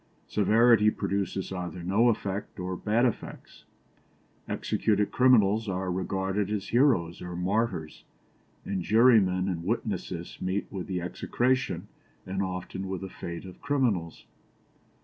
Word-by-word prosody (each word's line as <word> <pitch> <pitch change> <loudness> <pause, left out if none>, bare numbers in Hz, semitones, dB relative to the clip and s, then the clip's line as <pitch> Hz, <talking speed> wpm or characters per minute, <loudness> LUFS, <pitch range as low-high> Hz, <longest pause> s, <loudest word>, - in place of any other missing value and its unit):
Severity 110 +1 +4
produces 100 -2 -2
either 90 -2 -5
no 105 +7 +3
effect 100 -3 -3
or 90 0 -3
bad 110 +6 +1
effects; 120 - -5 0.8
executed 105 -1 0
criminals 110 -4 +4
are 95 0 -2
regarded 95 +2 -1
as 105 -2 -3
heroes 115 - +2
or 90 -1 -6
martyrs; 90 -3 -1 0.6
and 95 -2 -2
jurymen 105 -4 +4
and 85 -3 -2
witnesses 95 -4 -3
meet 95 +2 -1
with 95 -3 -5
the 95 -2 -2
execration 125 +8 -1 0.4
and 95 +1 -2
often 95 0 -4
with 95 -2 -4
the 95 - -6
fate 85 0 -7
of 90 -1 -12
criminals. 115 - -1
95 Hz, 125 wpm, -28 LUFS, 90-110 Hz, 0.8 s, Severity